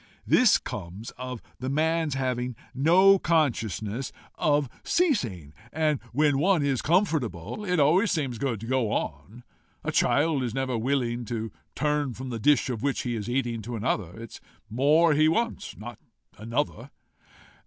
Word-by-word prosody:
This 250 Hz, -4 st, +5 dB
comes 100 Hz, +3 st, -7 dB
of 125 Hz, -2 st, -7 dB, 0.2 s
the 130 Hz, -, -3 dB
man's 160 Hz, 0 st, +1 dB
having 125 Hz, -2 st, -2 dB, 0.2 s
no 185 Hz, +8 st, +5 dB
consciousness 125 Hz, -, 0 dB, 0.2 s
of 145 Hz, -2 st, +1 dB, 0.2 s
ceasing, 115 Hz, -, 0 dB, 0.2 s
and 155 Hz, -3 st, +1 dB
when 145 Hz, +1 st, +2 dB
one 180 Hz, -1 st, +3 dB
is 135 Hz, -3 st, 0 dB
comfortable, 150 Hz, -, 0 dB
it 180 Hz, -4 st, 0 dB
always 175 Hz, +9 st, +4 dB
seems 135 Hz, -8 st, -2 dB
good 125 Hz, -5 st, -1 dB
to -, -, -6 dB
go 125 Hz, -2 st, 0 dB
on. 120 Hz, +4 st, -4 dB, 0.4 s
A -, -, -2 dB
child 150 Hz, -1 st, +2 dB
is 120 Hz, -2 st, -3 dB
never 130 Hz, -2 st, -1 dB
willing 120 Hz, 0 st, -1 dB
to 115 Hz, -2 st, -4 dB, 0.2 s
turn 150 Hz, -4 st, 0 dB
from 130 Hz, 0 st, -6 dB
the 115 Hz, -, -4 dB
dish 145 Hz, +1 st, +3 dB
of 120 Hz, -5 st, -3 dB
which 140 Hz, 0 st, 0 dB
he 120 Hz, -2 st, -2 dB
is 110 Hz, +1 st, -4 dB
eating 120 Hz, -3 st, -1 dB
to 120 Hz, +3 st, -6 dB
another. 105 Hz, -3 st, -2 dB
It 115 Hz, -1 st, -9 dB
is -, -, -11 dB, 0.3 s
more 150 Hz, +7 st, +4 dB
he 155 Hz, +1 st, +4 dB
wants, 230 Hz, +9 st, -1 dB
not 115 Hz, +1 st, -9 dB, 0.4 s
another." 115 Hz, +2 st, -3 dB
130 Hz, 155 wpm, -26 LUFS, 115-155 Hz, 0.4 s, This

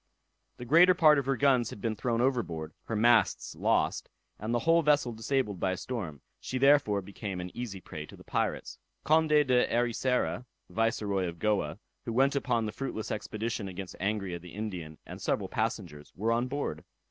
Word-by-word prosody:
The 125 Hz, -, -7 dB
greater 175 Hz, +7 st, +6 dB
part 155 Hz, -4 st, +6 dB
of 135 Hz, -, -4 dB
her 135 Hz, -1 st, +1 dB
guns 130 Hz, -4 st, +3 dB
had -, -, -9 dB
been 110 Hz, +1 st, -2 dB
thrown 115 Hz, +2 st, 0 dB
overboard, 85 Hz, -, -1 dB
her 115 Hz, -, -3 dB
masts 115 Hz, +2 st, +3 dB
lost, -, -, +1 dB, 0.3 s
and 110 Hz, +2 st, -3 dB
the 120 Hz, -, +2 dB
whole 165 Hz, +1 st, +5 dB
vessel 145 Hz, -5 st, +2 dB
disabled 115 Hz, -3 st, -1 dB
by 95 Hz, -1 st, +1 dB
a -, -, -4 dB
storm; 90 Hz, -, -5 dB, 0.2 s
she 130 Hz, -, -4 dB
therefore, 130 Hz, -7 st, +4 dB
became 100 Hz, -1 st, -6 dB
an 90 Hz, 0 st, -7 dB
easy 115 Hz, -6 st, -5 dB
prey 75 Hz, -4 st, -8 dB
to -, -, -12 dB
the -, -, -15 dB
pirates. -, -, -2 dB, 0.2 s
Conde 155 Hz, +2 st, +3 dB
de 140 Hz, -5 st, +4 dB
Ericeira, 120 Hz, +1 st, 0 dB, 0.2 s
Viceroy 105 Hz, -4 st, 0 dB
of 85 Hz, 0 st, -6 dB
Goa, 90 Hz, -5 st, 0 dB, 0.3 s
who 115 Hz, -, -3 dB
went 135 Hz, +4 st, +3 dB
upon 120 Hz, -5 st, 0 dB
the 105 Hz, -, -3 dB
fruitless 110 Hz, -4 st, -4 dB
expedition 110 Hz, 0 st, -3 dB
against 95 Hz, 0 st, -7 dB
Angria 100 Hz, -3 st, -2 dB
the 90 Hz, 0 st, -11 dB
Indian, 90 Hz, -8 st, -5 dB
and -, -, -9 dB
several -, -, -1 dB
passengers, 75 Hz, -3 st, -3 dB
were 110 Hz, +4 st, 0 dB
on 120 Hz, +2 st, +1 dB
board. 130 Hz, -, -3 dB
115 Hz, 180 wpm, -30 LUFS, 95-130 Hz, 0.3 s, greater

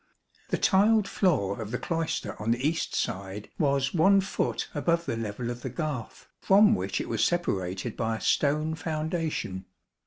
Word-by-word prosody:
28 -, -, -34 dB
The -, -, +1 dB
tiled 210 Hz, +2 st, +4 dB
floor 115 Hz, -, +1 dB
of 105 Hz, -, -5 dB
the 125 Hz, -, -2 dB
cloister 165 Hz, +1 st, -2 dB
on 105 Hz, -, -2 dB
the 120 Hz, +4 st, +2 dB
east 160 Hz, +1 st, -2 dB
side 100 Hz, +2 st, -3 dB
was 140 Hz, -2 st, +1 dB
one 195 Hz, +4 st, +5 dB
foot 195 Hz, -, -2 dB
above 170 Hz, +3 st, +1 dB
the 135 Hz, -, -2 dB
level 115 Hz, +2 st, -4 dB
of 120 Hz, 0 st, -7 dB
the 130 Hz, -, -4 dB
garth, 140 Hz, -3 st, -5 dB
from 205 Hz, +3 st, +5 dB
which -, -, -1 dB
it -, -, -4 dB
was -, -, 0 dB
separated 100 Hz, -, -1 dB
by 115 Hz, -1 st, -1 dB
a -, -, -11 dB
stone 150 Hz, +2 st, +1 dB
foundation. 160 Hz, -, -3 dB
145 Hz, 175 wpm, -28 LUFS, 115-170 Hz, -, one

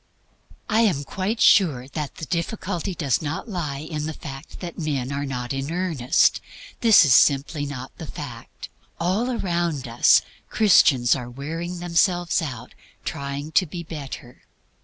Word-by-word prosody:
I 220 Hz, 0 st, +3 dB
am 180 Hz, -11 st, +2 dB
quite 195 Hz, +9 st, -3 dB
sure 145 Hz, -, +4 dB
that 150 Hz, -1 st, -5 dB
the 160 Hz, -, -6 dB
difficulty 180 Hz, +2 st, -3 dB
does 140 Hz, -5 st, 0 dB
not 155 Hz, +7 st, -4 dB
lie 155 Hz, -9 st, -4 dB
in 155 Hz, -2 st, -3 dB
the 160 Hz, -, -5 dB
fact 135 Hz, -2 st, -9 dB
that 175 Hz, -2 st, -7 dB
men 140 Hz, -5 st, -2 dB
are 140 Hz, 0 st, -3 dB
not 125 Hz, -1 st, -4 dB
in 135 Hz, +3 st, -3 dB
earnest. 165 Hz, -6 st, +2 dB, 0.4 s
This 225 Hz, -7 st, +7 dB
is 135 Hz, -, +5 dB
simply 145 Hz, +3 st, +3 dB
not 130 Hz, -2 st, -7 dB
the 160 Hz, -, -7 dB
fact. 125 Hz, -7 st, -9 dB, 0.3 s
All 190 Hz, +9 st, 0 dB
around 170 Hz, -, -1 dB
us 115 Hz, +1 st, +5 dB, 0.3 s
Christians 135 Hz, -, +5 dB
are 125 Hz, -3 st, -6 dB
wearing 165 Hz, +7 st, -5 dB
themselves 175 Hz, 0 st, +1 dB
out 130 Hz, -8 st, -6 dB
in -, -, -27 dB
trying 140 Hz, +2 st, -4 dB
to 185 Hz, +3 st, +3 dB
be 170 Hz, +3 st, -6 dB
better. 140 Hz, -6 st, -8 dB
155 Hz, 155 wpm, -23 LUFS, 135-175 Hz, 0.4 s, This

